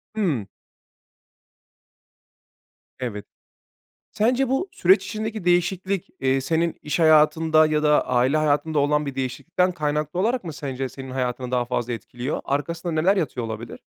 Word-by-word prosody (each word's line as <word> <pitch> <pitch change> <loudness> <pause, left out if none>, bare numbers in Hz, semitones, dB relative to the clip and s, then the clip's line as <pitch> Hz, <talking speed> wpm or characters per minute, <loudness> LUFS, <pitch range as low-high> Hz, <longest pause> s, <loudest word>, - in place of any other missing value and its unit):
Hımm. 155 - 0 2.5
Evet. 110 -5 -5 0.9
Sence 250 +4 +2
bu 270 +9 0
süreç 190 +2 +4
içindeki 215 -1 -4
değişiklik, 185 +2 +1
eee, 135 0 +2
senin 165 +4 0
iş 150 - -2
hayatında 155 0 +5
ya 155 0 0
da 150 -1 +3
aile 125 +3 +2
hayatında 155 0 +1
olan 150 +1 +2
bir 140 - -4
değişiklikten 135 +8 -1
kaynaklı 150 +1 -2
olarak 235 +2 0
mı 165 - -5
sence 135 -4 -4
senin 135 0 -9
hayatını 125 -1 -3
daha 125 -1 +1
fazla 120 0 -2
etkiliyor? 120 +5 -4
Arkasında 165 +5 -2
neler 170 +6 +3
yatıyor 130 -9 -2
olabilir? 110 +1 -7
150 Hz, 135 wpm, -23 LUFS, 130-175 Hz, 2.5 s, hayatında